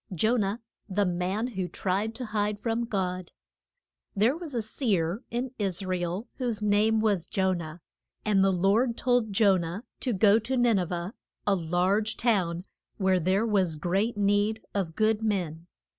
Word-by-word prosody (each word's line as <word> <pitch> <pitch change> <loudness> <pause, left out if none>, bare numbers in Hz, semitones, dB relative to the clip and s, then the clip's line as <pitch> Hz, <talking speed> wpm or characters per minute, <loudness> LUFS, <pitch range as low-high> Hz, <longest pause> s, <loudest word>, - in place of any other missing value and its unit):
JONAH, 215 +3 +1 0.3
THE 200 +1 +1
MAN 180 +5 -1
WHO 190 -6 -3
TRIED 200 +5 -2
TO 250 - -4
HIDE 210 -1 -1
FROM 230 +2 -1
GOD. 185 -5 -3 0.8
THERE 220 +7 +3
was 325 -5 -7
a 230 - 0
seer 205 - 0
in 245 +2 -3
Is 195 -2 -1
ra 185 0 0
el 180 +5 -3
whose 240 -5 -1
name 210 +2 +3
was 205 -6 +1
Jo 190 -1 +1
nah. 165 -2 -6 0.5
And 200 -3 +3
the 195 - +4
Lord 205 +7 +2
told 245 -4 +1
Jo 200 -1 +4
nah 170 +3 -4 0.2
to 250 - -1
go 205 +2 +5
to 255 +4 -2
Nin 240 -4 +3
e 180 - 0
veh, 175 +2 -4 0.3
a 205 - +3
large 185 +5 0
town 185 -7 +1 0.3
where 190 -2 +2
there 190 +6 +1
was 190 -7 +1
great 195 +8 0
need 205 +2 +1
of 180 -5 -2
good 220 0 +2
men. 175 -6 -2
200 Hz, 170 wpm, -28 LUFS, 185-220 Hz, 0.8 s, go